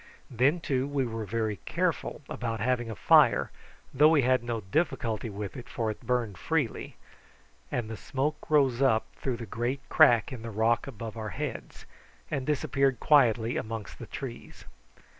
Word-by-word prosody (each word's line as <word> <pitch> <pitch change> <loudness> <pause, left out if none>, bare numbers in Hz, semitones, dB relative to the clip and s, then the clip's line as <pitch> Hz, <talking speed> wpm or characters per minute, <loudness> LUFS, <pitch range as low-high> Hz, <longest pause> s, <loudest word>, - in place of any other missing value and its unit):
Then, 130 +8 +2
too, 135 -4 -1
we 140 -2 0
were 115 -2 -4
very 110 -1 -1
careful - - -2
about 115 -2 -4
having 120 0 0
a 110 - -5
fire, - - +4 0.4
though 150 +4 +6
we 155 -4 +4
had 130 0 +2
no 120 -2 -3
difficulty 115 - -1
with 100 -1 -6
it, 125 - -9
for 115 -3 -1
it 105 - -10
burned 120 -5 -1
freely, 150 -9 -2 0.8
and 120 -3 -2
the 110 - -5
smoke 145 +7 -3
rose 135 -5 +3
up 110 -5 +3
through 130 -3 -2
the 115 - -6
great 120 +6 -3
crack 115 -1 +5
in 120 - -7
the 115 - -6
rock 115 +3 +1
above 115 -3 -7
our 110 -1 -4
heads, - - -6 0.5
and 135 -2 -2
disappeared 135 -3 +1
quietly 120 -6 +3
amongst 110 -2 -5
the - - -8
trees. - - -8
120 Hz, 165 wpm, -28 LUFS, 110-135 Hz, 0.8 s, though